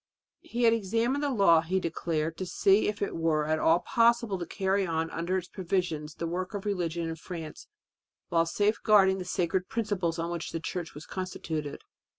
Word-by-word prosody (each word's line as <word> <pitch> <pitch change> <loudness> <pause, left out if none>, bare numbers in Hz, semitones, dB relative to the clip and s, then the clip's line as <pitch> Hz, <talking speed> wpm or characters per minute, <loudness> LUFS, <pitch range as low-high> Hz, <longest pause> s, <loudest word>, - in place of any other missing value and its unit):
He 240 +1 -3
had 230 -1 +6
examined 230 +6 0
the 290 - +1
law, 195 -10 +5
he 180 +4 0
declared, 165 -2 -2
to 185 - -2
see 195 +3 +3
if 205 -1 -2
it - - -3
were 160 -2 +1
at 155 +1 0
all 165 +2 +4
possible 235 -4 +2
to 175 - -5
carry 195 +1 0
on 165 -2 -1
under 170 +3 -1
its 180 -1 -4
provisions 170 -5 -2
the 170 - -4
work 185 +4 -3
of 200 - -5
religion 170 -4 -1
in 165 - -3
France 165 -1 -8 0.6
while 165 0 +2
safeguarding 205 -1 +3
the 180 - -5
sacred 180 0 -1
principles 200 -7 -1
on 170 +1 -2
which 170 -2 -4
the 165 - -2
Church 165 0 -5
was 150 - -9
constituted. 160 -5 -5
180 Hz, 185 wpm, -29 LUFS, 165-200 Hz, 0.6 s, had